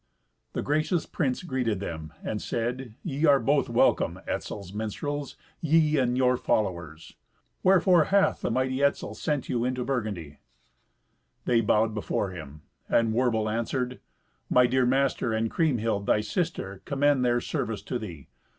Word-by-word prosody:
The - - -2
gracious 155 +3 0
prince 130 -2 -2
greeted 125 - -1
them, 80 -5 -6
and 105 - -3
said, 120 0 -3
"Ye 150 -1 -1
are 140 -1 +6
both 140 -2 +1
welcome, 120 - +2
Etzel's 100 -2 -4
minstrels, 140 +7 -4 0.2
ye 155 -2 +3
and 125 -1 +1
your 125 -1 +3
followers. 85 -9 -2 0.5
Wherefore 185 -3 +5
hath 200 0 +2
the - - -1
mighty 130 +2 0
Etzel 140 - +1
sent 145 -4 -2
you 120 -1 0
into 125 0 -1
Burgundy?" 105 - -3 1.1
They 120 -2 +3
bowed 110 0 +2
before 105 -2 -2
him, 75 -4 -10 0.3
and 115 -1 +3
Werbel 115 -3 +1
answered, 125 +3 -2 0.5
"My 125 0 +5
dear 125 0 +2
master, 130 -3 +1
and 110 0 0
Kriemhild 115 -10 0
thy 105 - +3
sister, 110 - -3
commend 140 -1 +2
their 120 -1 +2
service 110 -2 -3
to 125 - -3
thee. 85 - -8
125 Hz, 145 wpm, -27 LUFS, 110-140 Hz, 1.1 s, are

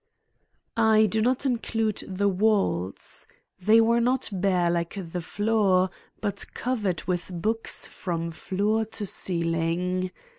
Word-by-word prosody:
I 220 -1 +5
do 220 +2 +1
not 255 +4 +1
include 225 -4 -1
the 195 +1 0
walls. 195 - 0 0.3
They 215 +5 +5
were 230 +1 +4
not 255 +2 +1
bare 180 -3 +2
like 170 +1 -2
the 180 -2 -4
floor, 195 -1 +2 0.3
but 200 -2 -1
covered 215 -8 -1
with 180 -1 -2
books 220 +6 -1
from 170 -2 -4
floor 205 +6 0
to 220 -1 -5
ceiling. 175 +1 0
200 Hz, 120 wpm, -26 LUFS, 180-220 Hz, 0.3 s, I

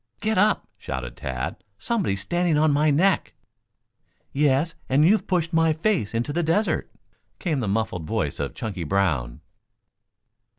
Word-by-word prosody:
"Get 220 +1 0
up!" 210 +3 +2
shouted 65 -2 -5
Tad. 65 +4 -5
"Somebody's 170 - -1
standing 175 - +1
on 155 0 +4
my 150 +2 +3
neck." 170 +6 +2 1.0
"Yes, 145 +3 +2 0.2
and 135 +3 +4
and 170 - +6
you've 215 - +1
pushed 175 -2 0
my 165 -1 +4
face 160 - 0
into 120 +6 -1
the 175 - +1
desert," 170 +7 0 0.5
came 160 -6 -1
the 115 - -2
muffled 100 -5 -1
voice - - -2
of - - -3
Chunky 100 -6 -4
Brown. 75 -10 0
150 Hz, 145 wpm, -24 LUFS, -, 1.0 s, and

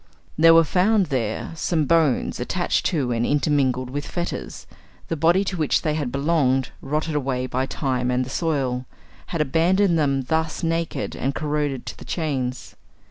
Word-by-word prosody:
There 165 +1 +7
were 165 - +7
found 190 +5 +2
there 115 -4 -2
some 160 -1 0
bones 160 -3 +2
attached 175 +8 0
to 140 -8 -1
and 115 0 0
intermingled 135 -3 +1
with 145 +1 -4
fetters; 175 -1 -5 0.4
the 165 - 0
body 170 +5 +3
to 190 -2 -3
which 155 -3 +1
they 155 - +1
had 145 -5 -2
belonged, 140 -2 +1
rotted 155 +3 -2
away 130 -3 -1
by 130 +1 -2
time 130 -3 -1
and 125 0 +1
the - - -9
soil, 135 -6 -1 0.4
had 165 - -2
abandoned 170 +5 +2
them 140 -3 +1
thus 160 +4 -1
naked 165 0 -2
and 135 +2 -2
corroded 150 -3 -2
to - - -6
the - - -10
chains. 130 -6 -3
150 Hz, 165 wpm, -23 LUFS, 130-165 Hz, 0.4 s, There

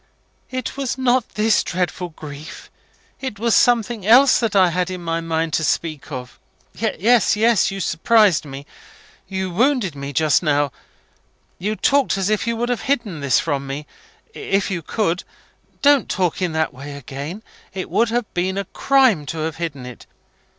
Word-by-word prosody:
"It 255 +1 -5
was 270 -2 -2
not 255 -2 +1
this 215 +1 +3
dreadful 180 0 -2
grief 155 -1 -10 0.5
it 260 -6 -5
was 230 +1 +1
something 235 -3 +2
else 255 +7 +6
that 225 -3 -1
I 185 -2 +5
had 180 +1 -1
it 185 - -4
in 180 - -9
my 165 0 -1
mind 165 -1 -2
to 160 - +1
speak 155 -1 -2
of. 125 -2 -7 0.3
Yes, 225 +4 +2
yes. 225 0 +3
You 195 - -5
surprised 195 +1 +3
me 140 -1 -9 0.6
you 190 -1 -3
wounded 235 - +1
me 140 0 -6
just 150 0 +2
now. 145 -4 +1 0.9
You 210 +4 -2
talked 280 -3 +2
as 195 +2 0
if 215 +1 0
you 230 - 0
would 240 +2 -2
have 245 - -1
hidden 230 - -1
this 140 -3 +2
from 140 -3 -2
me, 140 +2 -5 0.5
if 200 - -1
you 175 -3 -2
could. 180 0 -1 0.6
Don't 285 -2 +4
talk 180 -1 -1
in 175 -3 -1
that 160 0 0
way 140 +3 -9
again. 140 - -7 0.3
It 190 -1 -5
would 230 0 +2
have 240 0 0
been 185 +2 -1
a 200 - -2
crime 255 - +2
to 165 - -4
have 160 0 -3
hidden 150 -6 -5
it. 125 -1 -11
185 Hz, 175 wpm, -20 LUFS, 155-230 Hz, 0.9 s, else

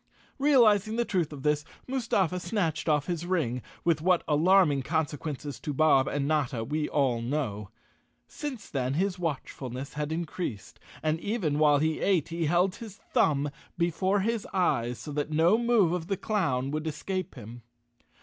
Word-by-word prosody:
Realizing 225 -7 +4
the 235 0 +1
truth 175 -8 0
of 140 -3 -8
this, 150 0 +1 0.2
Mustafa 220 -9 0
snatched 165 -6 -1
off 150 -1 +2
his 175 -2 -3
ring, 160 -9 -1 0.2
with 165 -3 +2
what 180 +1 +3
alarming 160 -1 +4
consequences 145 -2 -3
to 150 - -4
Bob 135 -3 +4
and 140 -1 -1
Notta 140 -7 0
we 150 +5 -2
all 130 -5 +1
know. 115 -6 -3 0.6
Since 275 -7 -7
then 130 -1 -1
his 185 +2 0
watchfulness 135 -5 -4
had 150 0 -3
increased, 160 - -4 0.2
and 155 +1 +1
even 175 -8 -1
while 150 -1 +5
he 155 +2 0
ate 185 -7 +1
he 165 -1 -1
held 180 +4 +2
his 220 -4 -9 0.2
thumb 145 -1 +2 0.3
before 185 +4 +1
his 225 +1 -1
eyes 120 -10 +1
so 120 +8 -8
that 145 +1 -2
no 165 +6 +4
move 235 -7 +3
of 170 -2 -3
the 195 - -1
clown 140 - 0
would 155 +1 -3
escape 185 +3 -4
him. 120 0 -10
160 Hz, 160 wpm, -28 LUFS, 145-185 Hz, 0.6 s, while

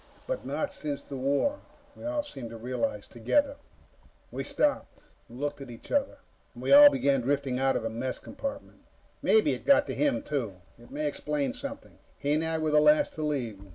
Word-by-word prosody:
But - - -4
not 290 - -2
since 145 -2 -4
the 140 - -8
war, 140 - 0 0.4
we - - -13
all 300 0 -1
seemed 135 - -8
to 115 - -8
realize 115 -3 -3
together. 275 - 0 0.7
We - - -4
stopped, 295 -1 -1 0.3
and 120 +2 -11
looked 145 0 -3
at 135 - -8
each 115 - -12
other, 280 -1 0 0.4
and - - -9
we - - +3
all 290 +1 +11
began 140 - +1
drifting 135 0 0
out 135 0 +2
of - - -1
the 115 - -1
mess 125 +3 -3
compartment. 280 +1 -7
And - - -30 0.4
maybe 440 - +4
it - - -6
got 280 +1 +5
to - - -4
him, 290 -2 +1
too. 125 -10 -3 0.2
It 120 - -16
may 150 +1 -3
explain 150 - -2
something. 280 +2 -8 0.2
He 145 +1 0
and 155 +1 +1
I 160 0 -1
were 155 -1 0
the 150 0 +5
last 150 0 +4
to 155 - -6
leave. 125 -10 -2
145 Hz, 205 wpm, -28 LUFS, -, 0.7 s, all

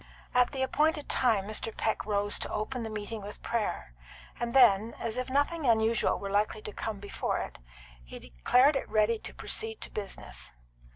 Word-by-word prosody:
At 250 0 +4
the 265 -2 -1
appointed 300 +3 +1
time 225 -6 +3
Mr. 215 +1 -2
Peck 220 -1 -1
rose 205 -1 +2
to - - -4
open 240 +4 -3
the 225 - -4
meeting 215 +1 -5
with 205 +1 -9
prayer; 210 - -2 0.5
then, 235 -3 +4
as 230 -1 -3
if 255 +1 -3
nothing 285 +2 +1
unusual 225 0 +3
were 200 -1 -5
likely 210 +1 0
to 210 - -6
come 215 -3 -4
before 205 0 -2
it, - - -5 0.4
he - - -9
declared 250 - +3
it 270 - -2
ready 215 +1 +2
to - - -7
proceed 445 0 -2
to - - -7
business. 65 - -6
220 Hz, 175 wpm, -30 LUFS, 205-255 Hz, 0.5 s, At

